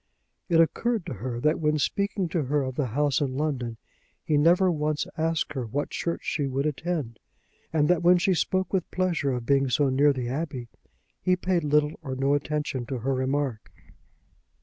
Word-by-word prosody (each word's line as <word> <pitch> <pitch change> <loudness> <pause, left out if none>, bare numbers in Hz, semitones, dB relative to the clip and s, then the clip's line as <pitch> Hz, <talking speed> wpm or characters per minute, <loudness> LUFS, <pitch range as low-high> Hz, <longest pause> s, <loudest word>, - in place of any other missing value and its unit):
It 165 -1 +4
occurred 215 +5 +1
to 175 - -4
her 120 +3 -4
that 155 +4 +2
when 150 -1 +1
speaking 200 +4 0
to 160 -3 -1
her 145 +2 +1
of 130 0 -3
the 135 0 -1
house 145 +4 +1
in 135 -2 -1
London 130 -6 -2 0.5
he 155 -4 +1
never 175 +5 +4
once 150 -1 -1
asked 160 -1 -1
her 130 -5 -3
what 140 +6 -3
church 170 - -2
she 145 -3 -1
would 135 +2 -1
attend; 150 -5 -2 0.5
and 150 -2 +2
that 175 -1 +3
when 175 +1 +6
she 185 +2 +2
spoke 185 +3 0
with 185 -3 0
pleasure 175 -7 0
of 125 -2 -3
being 135 0 +3
so 140 +2 +2
near 140 +3 +4
the 130 -3 -3
Abbey, 130 -3 -4 0.5
he 185 - +3
paid 180 -2 0
little 150 +1 +1
or 135 -4 -5
no 135 +2 +1
attention 145 -3 -2
to 130 - -3
her 130 +3 -1
remark. 130 -2 -2
150 Hz, 190 wpm, -26 LUFS, 130-165 Hz, 0.5 s, when